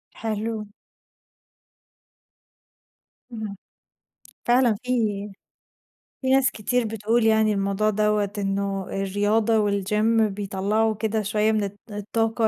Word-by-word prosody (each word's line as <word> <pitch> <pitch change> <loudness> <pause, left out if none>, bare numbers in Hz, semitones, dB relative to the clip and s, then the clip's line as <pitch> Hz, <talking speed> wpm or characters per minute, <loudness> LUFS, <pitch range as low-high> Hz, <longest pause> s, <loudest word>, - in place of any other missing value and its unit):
حلو. 220 -1 -3 2.6
اهم، 215 -4 -6 0.9
فعلًا 240 -2 +4
في 250 - -5 1.3
في 260 - -1
ناس 265 0 +4
كتير 240 +3 0
بتقول 225 +2 0
يعني 220 -1 +4
الموضوع 200 +2 +1
دوّة، 210 -1 +1
إنه 195 0 -1
الرياضة 205 +3 +1
والجيم 210 +2 +2
بيطلّعوا 205 +2 0
كده 220 0 -1
شوية 215 +1 +1
من 215 -1 +1
الط 200 0 -6
الطاقة 225 +2 0
215 Hz, 95 wpm, -24 LUFS, 200-225 Hz, 2.6 s, فعلًا